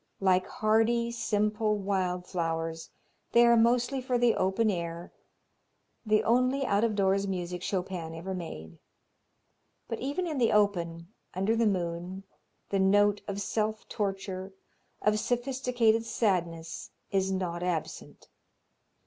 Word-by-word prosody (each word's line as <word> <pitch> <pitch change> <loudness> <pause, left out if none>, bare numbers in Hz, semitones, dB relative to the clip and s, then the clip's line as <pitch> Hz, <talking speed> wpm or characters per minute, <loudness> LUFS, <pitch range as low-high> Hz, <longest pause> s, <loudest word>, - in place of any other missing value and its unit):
Like 185 -1 +3
hardy, 225 +2 +2
simple 215 -2 0
wild 185 -3 -1
flowers, 165 -2 -3 0.4
they 235 0 +7
are 235 0 +6
mostly 245 +3 +2
for 250 -1 0
the 240 -1 +4
open 195 +4 +1
air, 170 -1 -5 0.9
the 215 -2 +2
only 255 +4 +2
out 200 -1 +2
of 225 -2 +1
doors 195 0 +2
music 180 -2 -3
Chopin 180 -4 -3
ever 180 +4 -5
made. 80 - -7 1.1
But 230 - -4
even 285 +8 -2
in 310 -5 -2
the 235 - +3
open, 175 -3 0 0.2
under 195 +5 +1
the 230 -1 +3
moon, 180 0 -2 0.5
the 195 - 0
note 205 +1 +4
of 200 -1 -3
self 215 +2 -2
torture, 195 -1 -3 0.5
of 210 0 +3
sophisticated 245 -2 +1
sadness 170 -8 -1 0.2
is 190 -1 +1
not 180 -2 -2
absent. 175 -4 -4
200 Hz, 125 wpm, -29 LUFS, 180-225 Hz, 1.1 s, they